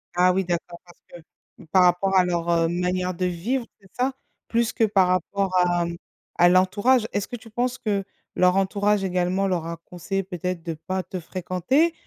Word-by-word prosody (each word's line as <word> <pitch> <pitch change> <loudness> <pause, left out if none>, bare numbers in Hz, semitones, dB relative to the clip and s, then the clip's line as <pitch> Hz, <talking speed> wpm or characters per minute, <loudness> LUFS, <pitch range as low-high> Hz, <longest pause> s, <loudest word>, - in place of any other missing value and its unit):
Ah 180 +1 +4
oui, 190 -1 0
d'accord, 170 0 -3
parce 175 - -19 0.6
que, - - -14
par 185 -1 +5
rapport 180 +2 +2
à 180 - +5
leur, 170 -1 -1
heu, 165 -1 +3
manière 180 +1 -1
de 180 +2 -2
vivre, 230 +9 -2
c'est 195 -2 -21
ça? 260 +2 +1 0.3
Plus 235 0 +1
que 225 - +1
par 195 -3 +3
rapport 185 +2 0
à, 175 -1 +2
mmh, 170 0 -4 0.4
à 175 0 +6
l'entourage? 205 +6 +3
Est-ce 205 - -1
que 245 - -6
tu 225 0 -12
penses 245 +3 -1
que 200 -3 -1 0.3
leur 180 0 +4
entourage 200 +1 +1
également 185 +1 0
leur 175 -3 -1
a 165 0 -5
conseillé 195 +2 -3
peut-être 180 -2 -4
de 165 - -3
pas 185 +4 -4
te 185 +2 -6
fréquenter? 185 - 0
185 Hz, 195 wpm, -24 LUFS, 175-200 Hz, 0.6 s, à